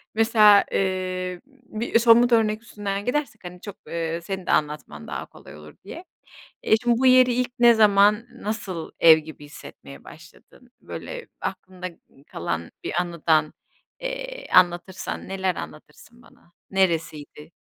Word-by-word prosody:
Mesela, 215 -2 +6
eee, 185 -1 -2
bir 240 -4 -2
somut 235 +1 +5
örnek 220 -2 +2
üstünden 200 -3 -5
gidersek, 295 -1 -3
hani, 180 0 -10
çok, 205 -2 -9
eee, 165 0 -3
senin 190 +1 -6
de - - -1
anlatman 150 - -2
daha - - -5
kolay - - -15
olur 75 0 -14
diye. 335 - -9 0.6
Eee, - - +4
şimdi 240 -1 +2
bu 260 - +1
yeri 255 -1 +6
ilk 250 +1 -1
ne 240 -1 +7
zaman, 210 0 +4
nasıl 210 -8 -6
ev 160 -1 +8
gibi 155 -1 -12
hissetmeye 145 -1 -13
başladın? 170 +9 -17
Böyle - - -8
aklında 185 -1 -6 0.4
kalan 85 -1 -5
bir - - -4
anıdan, 160 -3 0 0.5
eee, - - -6
anlatırsan 180 +1 +1
neler 190 -2 -1
anlatırsın 155 +10 -11
bana? 175 - -23 0.2
Neresiydi? 160 -5 -2
195 Hz, 135 wpm, -23 LUFS, 170-235 Hz, 0.6 s, ev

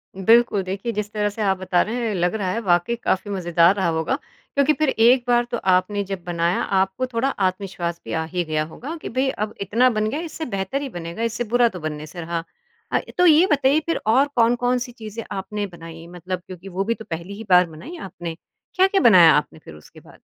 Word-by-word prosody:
बिल्कुल। 225 +2 +4
देखिए 195 +5 -4
जिस 210 -1 -3
तरह 210 -1 0
से 205 +2 -7
आप 195 -2 +1
बता 185 -1 +1
रहे 235 +2 -2
हैं 215 - -1
लग 175 +2 0
रहा 195 -4 -1
है 225 - -1
वाक़ई 175 +2 +1
काफ़ी 205 -3 -2
मज़ेदार 175 -1 +3
रहा 190 -3 0
होगा। 160 +9 0 0.4
क्योंकि 280 +2 +4
फ़िर 310 -2 0
एक 240 +1 +4
बार 240 0 +3
तो 240 - 0 0.2
आपने 200 +3 +1
जब 195 -2 -6
बनाया 170 0 0 0.2
आपको 190 +6 0
थोड़ा 250 +2 -1
आत्मविश्वास 185 -5 -2
भी - - -5
आ 160 - 0
ही 175 +2 -2
गया 155 -2 -1
होगा 260 - -8
कि - - -6
भई 260 +3 0
अब 215 -4 -3
इतना 230 +6 +3
बन 215 -2 0
गया 285 - -3
इससे 325 -1 -6
बेहतर 195 +9 -2
ही 280 - -4
बनेगा 170 +1 -6
इससे 230 +1 -1
बुरा 240 +1 +4
तो 185 - -8
बनने 155 -1 -5
से 175 +3 -8
रहा। 165 0 -3 0.5
अ, - - +2 0.2
तो 360 - +4
ये 325 +1 +7
बताइए 280 +1 +3
फ़िर 335 - 0
और 260 +6 +4
कौन-कौन 245 +1 +2
सी 245 0 -6
चीज़ें 225 -1 -8
आपने 205 +1 -3
बनाई? 165 -2 -11
मतलब 180 +1 -6
क्योंकि 185 0 -10
वो 190 +1 -2
भी 230 +3 0
तो 220 -1 -11
पहली 170 +3 -5
ही 225 - -7
बार 180 0 +6
बनाई 255 - -10
आपने। 170 - -7 0.4
क्या, 375 +1 +5
क्या 390 0 +1
बनाया 185 - +8
आपने 150 +1 -1
फ़िर 80 - -13
उसके 75 - -16
बाद? - - -18
200 Hz, 225 wpm, -22 LUFS, 175-240 Hz, 0.5 s, बनाया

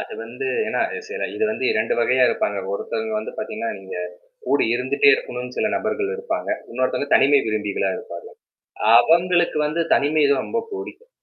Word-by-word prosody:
அது - - -7
வந்து 415 - -6 0.2
ஏன்னா, - - -1 0.3
சில 465 +2 -4
இது - - +1
வந்து 215 -11 -3
2 110 +1 0
வகையா 125 +2 +3
இருப்பாங்க. 105 -1 -1
ஒருத்தவங்க 220 - -3
வந்து 215 - -6
பார்த்தீங்கன்னா, 220 +1 -4
நீங்கக் 470 +2 -7 0.3
கூட 140 - +2
இருந்துட்டே 130 +3 +2
இருக்கணும்னு 125 0 -6
சில 215 - +1
நபர்கள் 420 0 -2
இருப்பாங்க. 460 +1 -4 0.2
இன்னொருத்தங்க, 130 +3 -1
தனிமை 140 +1 +5
விரும்பிகளா 105 -3 -1
இருப்பாங்க. 85 0 -9 0.7
அவங்களுக்கு 175 +5 +3
வந்து 160 +3 -2
தனிமைதான் 150 +2 +2
இது 140 - +2
ரொம்ப 465 - -2
புடிக்கும். 405 +4 -8
150 Hz, 155 wpm, -22 LUFS, -, 0.7 s, தனிமை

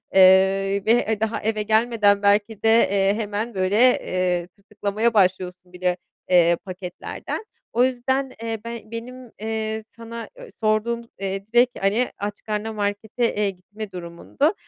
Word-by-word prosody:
eee, 195 +1 +5
ve, 220 - +4
eee, 225 -3 +2
daha 220 +1 -1
eve 215 0 -1
gelmeden 215 -2 +3
belki 205 +1 +2
de, - - +3 0.2
eee, 195 0 +2
hemen 215 +1 -3
böyle, 190 +2 +1 0.2
eee, 180 -1 -1
tırtıklamaya 205 +4 -2
başlıyorsun 185 -2 +1
bile, 180 0 0 0.3
eee, 170 -1 +5
paketlerden. 185 - -6 0.3
O 240 +2 +4
yüzden, 260 +1 0
eee, 225 -1 -3
be 235 -1 -5
benim, 245 +1 -8
eee, 220 0 -3
sana 230 0 -8
ö - - -11
sorduğum, 220 +2 0 0.2
eee, 195 0 -3
direkt, 245 +1 +6
hani, 210 +6 +2
aç 205 0 -5
karnına 215 +1 -3
markete, 210 +3 -1
eee, 205 -1 +1
gitme 205 +3 -9
durumundu. 180 - -1
210 Hz, 145 wpm, -23 LUFS, 195-230 Hz, 0.3 s, direkt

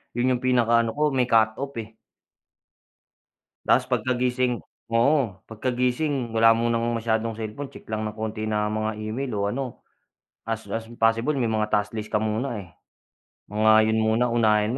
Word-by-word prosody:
yun 125 +2 +2
yung - - -13
pinaka-ano 115 -2 +2
ko, 150 0 +2
may 125 -2 +2
cut 110 -1 +4
off, 140 -1 -5
eh. 110 0 -7 1.7
Ta's - - +3
pagkagising 125 -1 0 0.3
oo, 115 -5 +2
pagkagising 125 +3 -1
wala 115 0 +7
munang 115 0 0
masyadong 115 0 -1
selpon. 110 +5 -5
Tsek - - -13
lang 110 0 -2
ng 105 - -4
konti 110 0 -4
na 105 -1 0
mga 110 0 -1
email, 120 +5 -3
o 100 0 0
ano 130 +1 -5 0.7
as 115 0 -3
as 115 0 -4
possible 115 +6 +2
may 120 - +1
mga 110 -1 0
task 105 +1 0
list 110 -1 -5
ka - - +1
muna. 110 +3 -2
Eh, 95 -3 -8 0.8
mga 110 +1 +4
'yon 110 - +2
muna. 110 +2 +2
Unahin 110 0 +2
115 Hz, 160 wpm, -25 LUFS, 110-125 Hz, 1.7 s, wala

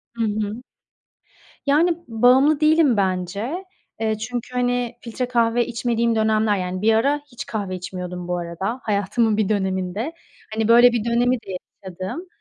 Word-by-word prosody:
Hı 230 - -1
hı. 215 +2 -2 1.0
Yani, 325 +4 +3
bağımlı 255 +6 +4
değilim 305 -5 +4
bence. 200 - -2 0.3
Eee, 220 -1 0
çünkü, 240 +3 -5
hani, 245 -1 0
filtre 245 +2 -4
kahve 235 -1 +2
içmediğim 235 -1 0
dönemler, 215 -1 +2
yani, 185 0 -3
bir 220 +1 +4
ara 280 +7 +2
hiç 245 - -7
kahve 200 -4 -3
içmiyordum 180 -1 -6
bu 180 0 -1
arada 175 +8 -4
hayatımın 210 +2 +1
bir 215 -3 +1
döneminde. 190 - -1 0.4
Hani, 220 0 0
böyle 240 +1 +7
bir 235 -3 -1
dönemi 240 +2 +2
de 195 -6 -6 0.3
yaşadım. 190 - -6
225 Hz, 145 wpm, -22 LUFS, 195-245 Hz, 1.0 s, böyle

